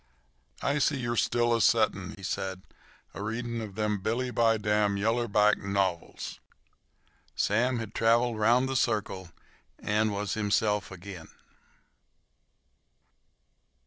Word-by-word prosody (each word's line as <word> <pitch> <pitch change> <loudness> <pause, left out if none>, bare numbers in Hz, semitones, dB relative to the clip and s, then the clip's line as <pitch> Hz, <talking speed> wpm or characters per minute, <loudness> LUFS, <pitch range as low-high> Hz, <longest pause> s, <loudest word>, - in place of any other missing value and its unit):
"I 140 +2 +1
see 145 0 +2
you 120 -2 -2
are - - -1
still 120 +1 +2
a 115 - +2
settin'," 105 -6 +2
he 100 - -13
said, 95 0 -3 0.5
"a - - -7
readin' 115 +2 -3
of 105 -3 -7
them 105 -1 0
billy 120 +5 -1
by 115 -2 +3
dam 105 -1 +1
yaller 115 +4 +1
back 105 0 +4
novils." 95 -3 -2 1.0
Sam 120 +4 +1
had 110 -2 -5
traveled 115 0 +2
round 120 +4 +4
the 135 - -3
circle 105 -7 -1 0.5
and 105 +1 0
was 100 0 -2
himself 105 -1 +1
again. 95 -2 -9
110 Hz, 125 wpm, -28 LUFS, 100-120 Hz, 1.0 s, back